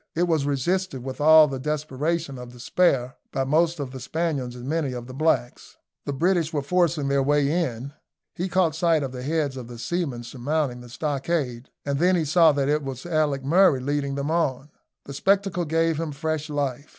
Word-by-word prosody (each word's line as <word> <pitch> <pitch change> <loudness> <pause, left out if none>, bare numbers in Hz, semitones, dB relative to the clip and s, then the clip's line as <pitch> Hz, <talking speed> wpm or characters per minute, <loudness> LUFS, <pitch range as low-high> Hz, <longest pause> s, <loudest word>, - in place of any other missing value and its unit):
It 170 - +2
was 160 -5 +1
resisted 145 0 -1
with 130 +2 -6
all 155 0 +8
the 135 -2 -4
desperation 150 0 -2
of 125 0 -9
despair 130 0 +1
by 135 - 0
most 160 +4 +2
of 135 -3 -4
the 130 - -7
Spaniards 140 -3 -2
and 125 0 -9
many 150 -3 -1
of 120 -1 -6
the 130 - -10
blacks. 135 -4 -1 0.3
The - - -2
British 165 +3 +1
were 145 -4 -2
forcing 170 -2 +1
their 140 0 +2
way 145 +1 +2
in. 140 -6 -2 0.4
He 180 +2 -3
caught 175 -3 +2
sight 160 -1 +2
of 135 - -4
the 125 -1 -7
heads 145 -1 -1
of 125 -3 -7
the 120 0 -9
seamen 135 -1 -3
surmounting 130 +1 -2
the 120 - -12
stockade, 140 -2 -2 0.2
and 140 -1 -1
then 180 +2 +4
he 165 -3 +1
saw 160 +2 +5
that 140 -2 0
it 150 +1 +2
was 135 0 -6
Alick 155 -5 0
Murray 165 0 +4
leading 140 +1 -2
them 140 +2 -2
on. 145 -4 -1 0.3
The 140 - -8
spectacle 195 +2 +1
gave 165 0 +1
him 160 -3 -3
fresh 155 +1 -3
life. 145 -2 -3
145 Hz, 200 wpm, -24 LUFS, 135-165 Hz, 0.4 s, all